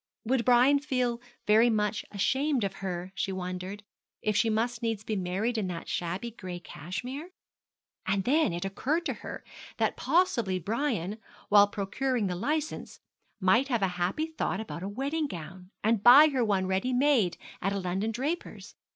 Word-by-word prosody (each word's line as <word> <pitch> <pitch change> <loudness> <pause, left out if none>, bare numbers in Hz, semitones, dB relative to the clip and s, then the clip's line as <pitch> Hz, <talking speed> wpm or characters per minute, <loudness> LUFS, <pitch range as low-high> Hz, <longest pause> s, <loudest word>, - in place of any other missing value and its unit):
Would 250 +1 +1
Brian 255 +3 +5
feel 250 -4 -1 0.2
very 220 +3 +5
much 210 -1 0
ashamed 265 +5 +1
of 195 -1 -3
her, 180 -1 -4
she 195 - -2
wondered, 185 +2 -5 0.4
if 215 -1 +1
she 225 +2 +3
must 230 +2 0
needs 225 -3 -2
be 215 0 -2
married 200 +5 -1
in 200 - -1
that 170 -2 -5
shabby 180 +7 -3
gray 185 -5 -7
cashmere? 190 - -6 0.8
And 195 0 +1
then 295 - +3
it 175 +2 -3
occurred 285 - -1
to - - 0
her - - -7 0.3
that - - 0
possibly 235 - +2
Brian, 215 - -2 0.3
while 205 0 +7
procuring 215 +4 -1
the 180 -2 -1
licence, 305 - -3 0.4
might 215 +8 +3
have 240 -7 0
a 190 - +3
happy 190 - 0
thought 320 -7 -2
about 220 -6 -6
a 195 - -4
wedding 280 +8 -2
gown, 180 - -9
and 220 -1 +2
buy 275 +7 +9
her 265 -4 +1
one 200 -4 +1
ready 190 +7 0
made 250 - +3 0.2
at 195 - 0
a 200 - -1
London 190 +3 -1
draper's. 285 +10 -4
215 Hz, 170 wpm, -29 LUFS, 190-255 Hz, 0.8 s, buy